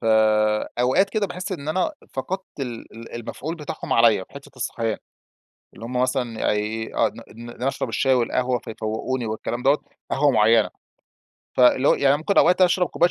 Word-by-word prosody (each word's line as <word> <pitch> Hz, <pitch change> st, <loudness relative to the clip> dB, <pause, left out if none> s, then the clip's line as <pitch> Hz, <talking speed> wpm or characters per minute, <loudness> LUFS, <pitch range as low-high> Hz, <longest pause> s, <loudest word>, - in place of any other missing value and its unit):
ف -, -, -10 dB, 0.8 s
أوقات 135 Hz, +11 st, +3 dB
كده 215 Hz, -2 st, 0 dB
باحس 180 Hz, +2 st, -5 dB
إن 155 Hz, -4 st, -5 dB
أنا 185 Hz, -, 0 dB, 0.2 s
فقدْت 185 Hz, +3 st, -5 dB
ال 120 Hz, -4 st, -6 dB
ال 115 Hz, 0 st, -10 dB
المفعول 130 Hz, +7 st, -5 dB
بتاعهم 150 Hz, -2 st, -5 dB
عليّا 115 Hz, -5 st, +4 dB
في -, -, -29 dB
حتّة 140 Hz, 0 st, -11 dB
الصحيان. 115 Hz, -3 st, -2 dB, 0.8 s
اللي 115 Hz, -, -9 dB
هم 125 Hz, +1 st, -1 dB
مثلًا 125 Hz, -3 st, -1 dB
يعني -, -, +1 dB
أي 110 Hz, +1 st, -4 dB
ا -, -, +3 dB, 0.2 s
إن 120 Hz, +2 st, -10 dB
أنا 125 Hz, +2 st, -4 dB
أشرب -, -, -2 dB
الشاي 135 Hz, -1 st, +2 dB
والقهوة 125 Hz, 0 st, +1 dB
فيفوّقوني 110 Hz, +4 st, -4 dB
والكلام 110 Hz, +2 st, -4 dB
دَوَّة، 140 Hz, +2 st, +4 dB, 0.3 s
قهوة 145 Hz, 0 st, +3 dB
معيّنة. 110 Hz, 0 st, +4 dB, 0.9 s
فاللي 130 Hz, +2 st, +5 dB
هو، -, -, +6 dB
يعني 140 Hz, +1 st, +3 dB
ممكن 165 Hz, +6 st, 0 dB
أوقات 180 Hz, +2 st, +5 dB
أشرب 180 Hz, 0 st, +3 dB
كوباية 175 Hz, +1 st, +2 dB
130 Hz, 175 wpm, -23 LUFS, 115-150 Hz, 0.9 s, هو